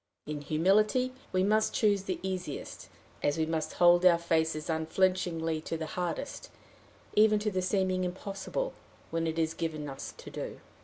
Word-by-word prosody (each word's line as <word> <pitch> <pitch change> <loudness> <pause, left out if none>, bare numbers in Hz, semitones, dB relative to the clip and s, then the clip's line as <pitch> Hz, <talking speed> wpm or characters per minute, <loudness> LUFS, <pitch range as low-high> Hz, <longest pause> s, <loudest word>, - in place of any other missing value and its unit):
In 150 -1 -4
humility 210 - +2 0.2
we 185 0 +2
must 215 +2 +2
choose 205 -3 +2
the 185 -3 -2
easiest, 185 -6 -5 0.3
as 145 - +1
we 160 - +2
must 160 -1 -2
hold 175 0 +5
our 180 -2 +7
faces 160 -2 0
unflinchingly 165 0 0
to 165 - -3
the 160 - -3
hardest, 175 -2 -3 0.6
even 215 0 +5
to 210 0 -1
the 185 -1 0
seeming 185 0 +1
impossible, 195 - -3 0.4
when 165 0 0
it 160 0 -2
is 160 -1 +1
given 155 -3 -3
us 135 -1 -6
to - - -10
do. - - -6
175 Hz, 160 wpm, -30 LUFS, 160-190 Hz, 0.6 s, our